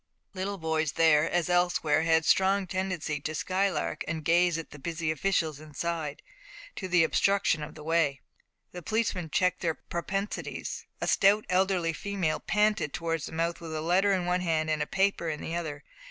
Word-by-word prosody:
Little 195 +1 -3
boys 160 -3 -1
there, 160 -1 +4
as 175 -2 0
elsewhere, 175 -4 +2
had 160 0 +3
a - - -8
strong 195 +1 +3
tendency 180 -5 -2
to 155 +2 -4
skylark 190 +4 -1
and 155 -1 -4
gaze 170 0 +3
at 165 - -7
the 145 - -11
busy 165 +2 -2
officials 160 -2 0
inside, 155 0 -4 0.5
to 190 - -4
the 180 -2 +4
obstruction 195 -1 +2
of 150 - -7
the 155 - -10
way. 160 -4 +1 0.5
The 180 - -8
policeman 205 -4 -1
checked 180 +3 +1
their 165 -3 0
propensities. 195 +3 -4
A - - -1
stout 205 +2 +4
elderly 185 -3 +2
female 190 -3 -2
panted 210 -7 +1
towards 165 -4 -2
the - - -9
mouth 165 +1 -2
with 160 -1 -6
a 155 - -2
letter 185 +5 +3
in 185 -2 +1
one 180 +1 +1
hand 160 -3 0
and 155 - 0
a - - -1
paper 195 -3 +1
in 150 -1 -3
the 165 - -5
other. 155 -4 -4
170 Hz, 185 wpm, -28 LUFS, 155-190 Hz, 0.5 s, there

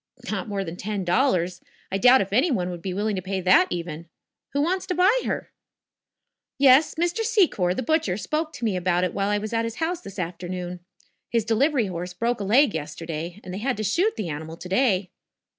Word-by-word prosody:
"Not - - -3
more 200 -2 -2
than 170 -1 -7
ten 205 -1 -3
dollars. 180 -4 +1 0.3
I 195 - 0
doubt 250 +4 +7
if 195 0 -4
any 260 +11 +4
one 180 - -1
would 175 -1 -7
be 190 - -4
willing 205 +3 -1
to - - -2
pay 190 +1 -3
that, 185 0 +5
even. 170 -2 -5 0.4
Who 285 - -1
wants 370 +4 -1
to 365 - -1
buy 370 +6 +4
her?" - - -3 1.1
"Yes; 275 +2 +5
Mr. 345 +7 0
Secor, 355 - +2
the 260 - -2
butcher, 270 - +1
spoke 305 - -2
to 240 - -5
me 210 -4 +1
about 180 0 +1
it 180 - -1
while 200 0 0
I 205 - +2
was 215 +2 -5
at 230 0 +1
his 230 0 -4
house 330 +5 -2
this 195 - -10
afternoon. 180 0 -5 0.5
His 230 -2 0
delivery 245 +2 +2
horse 180 -1 -5
broke 235 +5 -1
a - - -3
leg 240 +4 +4
yesterday 160 +3 -5
and 180 - -7
they 190 - -4
had 255 +2 -1
to 215 - -2
shoot 350 - +1
the 200 -6 -4
animal 160 +2 -6
to 180 - -8
day." 190 -4 +2
200 Hz, 215 wpm, -24 LUFS, 180-260 Hz, 1.1 s, doubt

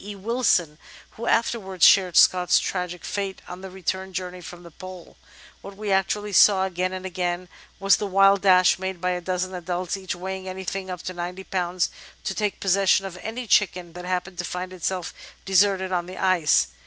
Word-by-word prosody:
E. 205 +1 -7
Wilson, 195 -7 0 0.3
who 235 +1 -7
afterwards 195 -6 +1
shared 185 -4 +5
Scott's 180 -1 +5
tragic 180 -2 -3
fate 195 -2 -3
on 180 +1 -8
the 190 - -8
return 190 +1 -4
journey 180 0 -5
from 175 +1 -10
the 170 - -13
Pole: 185 +1 -11 0.5
"What 195 0 -11
we 210 -1 -3
actually 205 +2 0
saw, 190 0 +6
again 185 0 -2
and 185 0 -6
again, 180 -1 -3 0.3
was 195 0 +4
the 210 - -3
wild 195 0 +4
dash 185 -2 +5
made 190 -1 -4
by 180 +1 0
a 180 0 -2
dozen 185 +1 -2
adults, 180 +1 -3
each 190 -2 -5
weighing 190 +1 -6
anything 190 0 -5
up 180 -1 -6
to 185 - -5
ninety 180 +2 -6
pounds, 180 -1 -1 0.3
to - - -2
take 210 0 -2
possession 195 0 +3
of 190 -2 -7
any 235 +3 -5
chicken 180 -5 +1
that 180 +1 -8
happened 180 0 -3
to - - -1
find 180 +1 -5
itself 180 0 -3 0.3
de 195 - -6
serted 190 0 +3
on 175 -1 -1
the 185 +1 -9
ice. 185 - +3
185 Hz, 190 wpm, -24 LUFS, 180-195 Hz, 0.5 s, saw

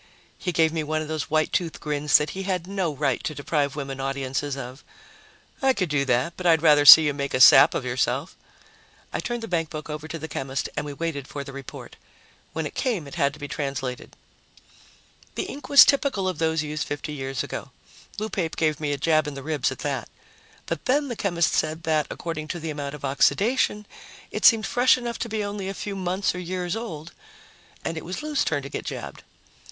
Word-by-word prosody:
He 180 - -2
gave 160 -2 +2
me 160 -1 -1
one 155 +1 -1
of - - -8
those 155 -1 -3
white 155 0 +1
tooth 170 -3 -1
grins 150 0 +3
that 150 0 -2
he 195 - -5
had 185 -3 -2
no 190 -3 -2
right 145 -1 -1
to 155 - -3
deprive 145 0 -1
women 135 -2 -5
audiences 135 +1 -2
of. 130 +1 -8 0.8
"I 265 -1 +4
could 185 -8 -1
do 145 -2 +1
that, 125 +5 +1
but 180 - -2
I'd 160 -1 +4
rather 150 -2 +5
see 160 +2 +12
you 145 - +1
make 140 -1 -3
a - - 0
sap 130 - +8
of - - -2
yourself." 130 +5 -1 0.8
I - - -1
turned 240 -1 -4
the - - -4
bankbook 160 -4 -3
over 150 +1 -6
to 165 - -5
the 160 0 -6
chemist 135 -3 -3
and 150 0 -3
we 145 - -5
waited 140 -3 -4
for 140 - -6
the 140 - -10
report. 140 -2 -10 0.5
When 160 -1 -3
it - - -5
came, 220 - -1
it 140 - -11
had 140 0 +1
to 150 - -13
be 145 - -5
translated. 135 -3 -4 1.2
The - - -1
ink 290 - -8
was 280 -2 +10
typical 270 -9 +1
of 185 -4 -3
those 160 -1 +1
used 150 0 -4
50 145 +1 -5
years 135 -2 -3
ago. - - -6 0.5
Lou 215 - -2
Pape 180 -6 -3
gave 155 -2 0
me 150 -2 -1
a - - -2
jab 155 +1 +2
in 145 - -5
the 135 - -7
ribs 150 -3 0
at - - -7
that. - - -2 0.6
But - - -4
then 280 +2 +1
the 240 - -3
chemist 175 -6 0
said 160 +1 -1
that, 155 -3 +1
according 155 -2 -5
to 175 - -4
the 160 -1 -4
amount 145 -1 -5
of 140 - -7
oxidation, 210 - +2 0.5
it - - -2
seemed 225 -2 +6
fresh 250 +1 +4
enough 240 -2 -5
to 230 - -3
be 215 -1 -2
only 200 -1 -4
a 195 - -5
few 200 +1 -5
months 185 +1 -1
or 180 - -5
years 180 +1 -3
old, 175 -8 -6 0.7
and 165 - -3
it - - -5
was 185 - -6
Lou's 300 -2 0
turn 145 -3 -1
to 140 - -7
get - - -5
jabbed. - - -6
155 Hz, 220 wpm, -24 LUFS, 145-185 Hz, 1.2 s, see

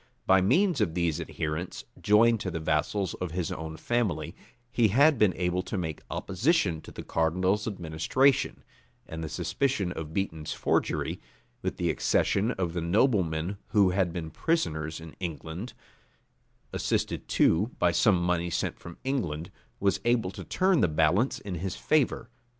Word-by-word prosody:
By 95 0 +5
means 165 - +3
of 80 - 0
these 85 -2 0
adherents, 80 +1 -4 0.2
joined 115 +2 +5
to 95 - -3
the 80 - -3
vassals 80 +5 0
of 90 -3 -5
his 90 -2 -2
own 80 0 -5
family, 120 -4 -1 0.4
he 115 -2 +3
had 140 +6 +4
been 105 -3 +5
able 90 0 0
to 95 +2 -4
make 80 -4 -4
opposition 95 - +1
to - - -12
the - - -8
cardinal's 90 +6 +1
administration; 95 - +1 0.4
and 80 0 -6
the 80 - -4
suspicion 100 - -1
of 80 -3 -6
Beaton's 80 -4 -3
forgery, - - -1 0.4
with - - -3
the - - +1
accession 100 +4 +1
of 90 -3 -2
the 85 - -2
noblemen 90 - +1
who 100 -4 +4
had 95 -2 +1
been 80 -2 -5
prisoners 80 - -1
in 80 -1 -10
England, 85 - -5 1.0
assisted - - -1
too 100 +8 +3
by 90 - +3
some 95 +1 +4
money 85 0 0
sent - - -2
from 85 -1 -10
London, 85 - -2 0.3
was 100 0 +1
able 120 -6 +1
to - - -8
turn 185 -4 +2
the - - +4
balance 80 - +2
in 100 - -7
his 90 +1 -3
favor. 145 -6 +1
90 Hz, 155 wpm, -28 LUFS, 80-110 Hz, 1.0 s, By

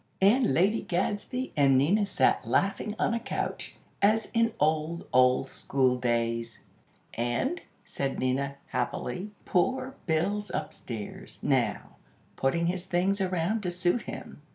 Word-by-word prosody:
and 225 +6 +4
Lady 200 +6 +3
Gadsby 205 +8 -2
and 140 -2 +5
Nina 195 +10 +3
sat 130 - +2
laughing 195 - 0
on - - +1
a 235 - 0
couch, 235 - -4 0.3
as 215 +2 +3
in 230 0 +3
old, 155 +2 0
old 125 +1 +4
school 130 -2 +1
days. 115 -2 -1 0.5
"And," 120 - -1 0.2
said 135 -1 -3
Nina, 135 +2 0
happily; 125 +8 -2 0.2
"poor 260 +8 +1
Bill's 195 +6 0
upstairs, 110 -4 -6
now, - - 0 0.4
putting 170 +6 +1
his 180 +1 -2
things 190 +3 +1
around 185 +3 0
to 180 - -2
suit 180 +5 +1
him. - - -8
175 Hz, 130 wpm, -28 LUFS, 130-205 Hz, 0.5 s, and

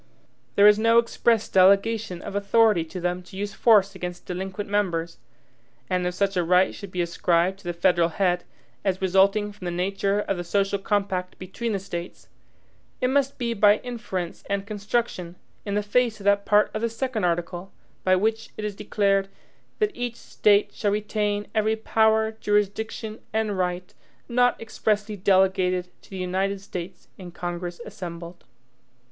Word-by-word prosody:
There 200 - +6
is 210 0 +6
no 230 +1 +4
express 235 -1 +2
delegation 195 0 +3
of 200 - -6
authority 205 -2 +3
to 180 +3 -7
them 180 +1 -2
to 180 +1 -13
use 205 +1 -3
force 200 -4 +4
against 180 -2 -6
delinquent 190 +3 -5
members; 170 -8 -1 0.7
and 180 -1 +1
if 180 - -3
such 195 0 0
a 180 - +2
right 180 +2 +3
should 200 - -9
be 180 -1 -1
ascribed 170 +2 +1
to 200 - -19
the 175 - -1
federal 170 -1 +3
head, 175 0 0 0.4
as 190 -2 0
resulting 195 +3 +3
from 205 -3 -11
the - - -1
nature 195 +3 0
of 195 -2 -2
the 175 - -3
social 195 +2 0
compact 195 -2 -1
between 215 +5 -4
the - - +1
States, 175 -2 -7 0.7
it 255 - +1
must 275 0 +1
be 235 -2 -1
by 205 -1 +5
inference 215 -8 -5
and 200 0 -1
construction, 205 -4 -2 0.3
in 200 - -1
the 210 - +1
face 225 +1 +1
of - - -10
that 200 0 +2
part 210 0 +4
of 215 - -3
the 230 - 0
second 230 -1 -3
article, 175 +2 -2 0.3
by 185 0 +4
which 220 +3 0
it 215 - -4
is 210 - -3
declared, 195 -1 +1 0.5
"that 425 -1 +1
each 245 -1 -3
State 210 -3 +2
shall 205 - -1
retain 210 0 -1
every 220 0 +2
power, 220 0 +2
jurisdiction, 210 +2 -1
and 215 -2 0
right, 180 -1 -2 0.3
not 245 +1 +2
EXPRESSLY 215 -1 -1
delegated 185 -1 +2
to - - -20
the 195 - -7
United 190 +2 -1
States 185 -2 -8
in 180 -2 -8
Congress 175 0 -5
assembled." 170 -2 -8
200 Hz, 165 wpm, -25 LUFS, 180-215 Hz, 0.7 s, There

